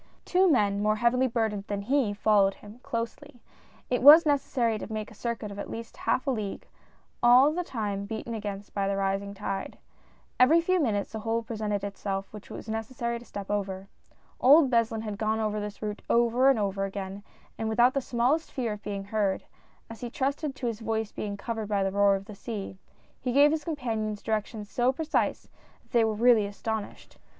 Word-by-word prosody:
Two 370 +1 +4
men, 205 -8 +2
more 215 +1 +2
heavily 240 +3 +2
burdened 220 -4 -1
than 200 -1 -3
he, 260 -1 +1
followed 205 -1 +3
him, 210 +3 -14
closely. 245 +4 -5 0.5
It 245 - 0
was 300 +5 +10
necessary 250 -6 +1
to - - -7
make 215 0 -4
a - - -12
circuit 225 -1 -4
of 200 - -8
at - - -5
least 230 0 -7
a - - -18
half 260 - 0
league, 215 -8 -3 0.6
all 250 +4 +7
the 355 +2 -1
time 205 - -3
beaten 220 +2 -5
against 205 -2 -6
by 200 -1 0
the 195 0 0
rising 195 +1 -1
tide. 195 0 -4 0.6
Every 300 +7 +6
few 370 +2 +1
minutes 210 -9 -1
a 220 - -3
hole 225 +1 -1
presented 210 -3 -3
itself 195 -1 -4
which 210 -1 -10
it - - -8
was - - -9
necessary 235 +2 -3
to 240 - -14
step 200 -2 -6
over. 195 -1 -3 0.5
Old 275 +1 +6
Beslin 225 -2 +1
had 210 -2 -5
gone 220 0 0
over 215 -1 -1
this 210 0 -6
route 210 0 -4
over 240 +3 +4
and 270 - +4
over 195 -1 -1
again; 195 0 -6 0.4
and 220 - -1
without 240 +3 +4
the 275 - 0
smallest 255 +7 0
fear 240 -5 -2
of 210 - -9
being 200 -2 -4
heard 200 -1 -1 0.3
— - - -36
as 225 - -10
he 240 - -4
trusted 280 +3 -2
to 270 - -6
his 230 -3 -2
voice 220 -1 -2
being 205 -1 -5
covered 225 0 -4
by 200 -2 +1
the 195 - 0
roar 200 0 +4
of 195 0 -6
the 210 - -9
sea 200 -2 -6 0.2
— - - -35
he 250 - -1
gave 285 +3 +6
his 310 -1 -1
companions 225 -9 -3
directions 215 -1 -3
so 245 +4 +1
precise, 310 +3 -1 0.4
that - - -32
they 235 -2 +4
were 220 -1 0
really 225 -2 +4
astonished. 215 +1 -6
220 Hz, 205 wpm, -28 LUFS, 205-245 Hz, 0.6 s, was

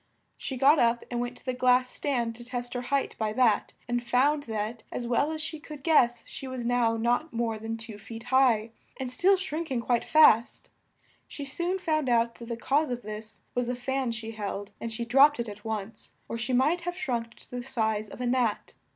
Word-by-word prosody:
She 265 - -5
got 280 +4 +5
up 235 0 +2
and 240 - -1
went 245 0 -4
to - - -21
the 255 - -1
glass 250 0 +3
stand 240 -5 -1
to 240 +1 -10
test 245 0 -5
her 245 - -2
height 275 +2 -1
by 215 -1 0
that, 235 -3 +2
and 240 0 0
found 280 +5 +2
that 220 +1 -3
as 240 - -4
well 245 +6 +1
as 310 -1 -3
she 315 0 -5
could 300 -2 -10
guess 240 -8 +3
she 270 - -8
was 255 -2 -5
now 235 -2 +2
not 245 +7 +1
more 230 -1 -1
than 225 +1 -4
two 225 -2 -8
feet 225 +2 -9
high, 235 -4 +4 0.3
and 260 -2 -3
still 380 +9 +4
shrink 335 -3 -4
ing 255 -3 0
quite 235 0 +1
fast. 250 -7 +4 0.6
She 285 - -7
soon 345 +7 -1
found 310 -7 0
out 235 -1 +3
that 235 - -11
the 235 -1 -4
cause 285 +5 +1
of 245 -1 -4
this, 215 +1 -8
was 245 -1 0
the 250 - -1
fan 260 0 -1
she 225 0 -5
held 205 -2 -5
and 230 - -4
she 235 +1 -3
dropped 275 +4 +5
it 235 - -2
at 210 0 -9
once, 220 -1 -5
or - - -4
she 240 +2 -3
might 285 +8 +3
have 355 +1 -4
shrunk 235 -9 -3
to - - -19
the 250 0 -4
size 220 -4 -1
of - - -10
a 250 - -2
gnat. 245 -3 0
245 Hz, 220 wpm, -28 LUFS, 230-270 Hz, 0.6 s, got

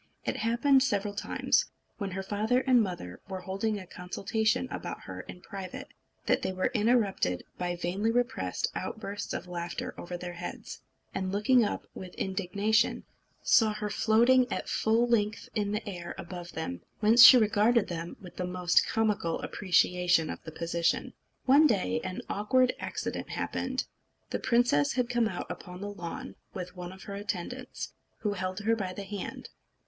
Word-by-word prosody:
It - - -1
happened 240 +4 +3
several 205 -5 0
times, - - +1 0.3
when 200 -2 -2
her 190 +1 -4
father 215 +6 +1
and 255 -3 +5
mother 175 - -4
were 190 -1 -4
holding 195 +4 -1
a 190 - -8
consultation 220 +8 -1
about - - -5
her - - -7
in 180 - -11
private, 190 -3 -7 0.4
that - - +2
they - - -1
were 185 0 0
interrupted 210 - +2 0.2
by 175 0 -1
vainly 180 +5 -1
repressed 230 - 0
outbursts 205 +1 -5
of - - -3
laughter 175 -1 -4
over 175 0 -5
their 175 0 -6
heads; 175 0 -7 0.3
and 190 -1 -2
looking 220 +5 +4
up 210 - -2
with 185 -1 -9
indignation, 200 +4 +1 0.4
saw 215 -2 +4
her 210 -1 -3
floating 240 +5 +4
at - - -2
full 225 +2 +2
length 215 -2 0
in 205 -2 0
the 210 +1 -3
air 175 -3 -6
above 175 0 -7
them, 90 - -4 0.2
whence 225 +3 +8
she 260 - +12
regarded 215 +1 +3
them 170 0 -5
with 180 -2 -12
the 180 - -2
most 180 -1 +3
comical 210 -7 0
appreciation 180 -3 +2
of - - -7
the 160 - -6
position. 170 +1 0 0.3
One 285 +4 +7
day 185 - +1
an 185 -1 -4
awkward 250 +5 +2
accident - - -4
happened. - - -2 0.5
The - - -1
princess 235 - +3
had 250 -1 0
come 240 -2 +2
out - - -4
upon 180 -1 -8
the 205 +1 -5
lawn 170 -3 -6 0.2
with 180 0 -6
one 180 -1 -6
of 190 0 -12
her 200 - -7
attendants, 205 +5 -5 0.3
who 210 -2 0
held 185 +1 -3
her 225 +2 +2
by 190 -4 -3
the 200 - -6
hand. 200 0 -6
200 Hz, 165 wpm, -29 LUFS, 180-225 Hz, 0.5 s, she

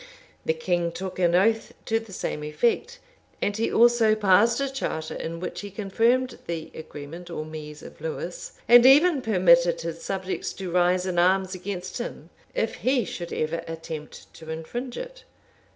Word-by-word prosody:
[] - - -32
The 475 - +2
king 175 - 0
took 185 +2 -6
an 175 -1 +3
oath 220 +4 +2
to 225 0 +1
the 225 -2 -13
same 150 -5 -4
effect, 235 - 0 0.4
and 205 - 0
he 225 +2 0
also 235 -2 +5
passed 215 +3 +4
a 275 - 0
charter 160 -12 -3
in 165 +1 -5
which 180 - -5
he 205 - -7
confirmed 230 +6 +1
the 165 -2 -4
agreement 160 +3 -9
or 155 -2 -4
Mise 150 -1 -9
of - - -12
Lewes; 160 +2 -5
and 240 +1 +9
even 295 +2 +6
permitted 170 -5 +4
his 165 0 -5
subjects 190 -1 -3
to 185 -2 -6
rise 180 +1 +3
in 180 -2 0
arms 190 +1 +3
against 185 +2 -5
him, 175 -8 -7 0.2
if 225 - -1
he 250 +4 +1
should 175 -2 -6
ever 160 +2 -1
attempt 160 -2 -8
to 160 -1 -12
infringe 240 +11 -5
it. - - -8
185 Hz, 170 wpm, -25 LUFS, 165-230 Hz, 0.4 s, and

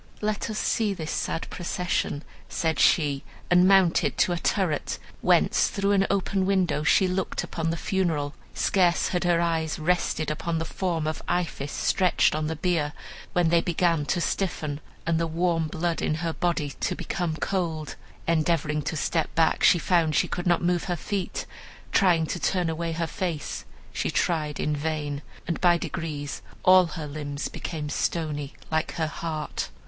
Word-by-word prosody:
"'Let 215 +1 -1
us 215 - -3
see 215 -3 +1
this 160 -3 -4
sad 165 - -2
procession,' 175 -4 -2 0.3
said 160 -3 -1
she, 145 -4 +3 0.3
and 180 +1 +6
mounted 190 -3 +4
to - - +3
a 175 - 0
turret, 175 -8 0 0.2
whence - - +4
through 200 -1 0
an 195 -1 +3
open 195 -1 +1
window 185 -6 +2
she 185 +5 +4
looked 185 +1 -1
upon 165 -1 -2
the 165 - -1
funeral. 160 -7 0 0.2
Scarce 180 -3 +2
had 180 0 -1
her 175 -1 +3
eyes 165 -2 0
rested 160 -1 0
upon 165 +2 -2
the 165 - -2
form 170 -2 -2
of 155 0 -2
Iphis 165 -5 -1
stretched 185 -2 +2
on 155 0 -1
the 160 - -2
bier, 160 -2 0 0.4
when 175 -2 +3
they 170 0 +4
began 165 -3 +1
to 175 - +1
stiffen, 155 -5 -2 0.3
and 165 -1 +1
the 165 - 0
warm 165 0 +1
blood 165 +2 -1
in 155 - +1
her 165 - 0
body 170 -5 -1
to - - -1
become 170 -3 -2
cold. 160 -4 -2 0.3
Endeavoring 155 -2 +1
to 160 - -3
step 160 +2 0
back, 165 -1 +3
she - - +7
found 165 -2 +2
she - - +3
could 175 - -3
not 175 0 +3
move 175 -1 +1
her 180 - -1
feet; 190 +1 -3 0.5
trying 175 -4 +4
to 175 - -3
turn 180 -1 +1
away 165 +1 -2
her 165 +1 -1
face, 165 -1 -4 0.3
she - - -1
tried 155 -4 0
in 150 - 0
vain; 150 -1 -2 0.3
and 170 - -2
by 175 -1 +5
degrees 155 -5 -4 0.2
all 185 -1 +7
her 160 -2 -6
limbs 145 -1 -4
became 155 -3 -5
stony 150 -2 -2 0.2
like 160 0 0
her 160 - -1
heart. 155 -1 -4
165 Hz, 170 wpm, -26 LUFS, 155-180 Hz, 0.5 s, she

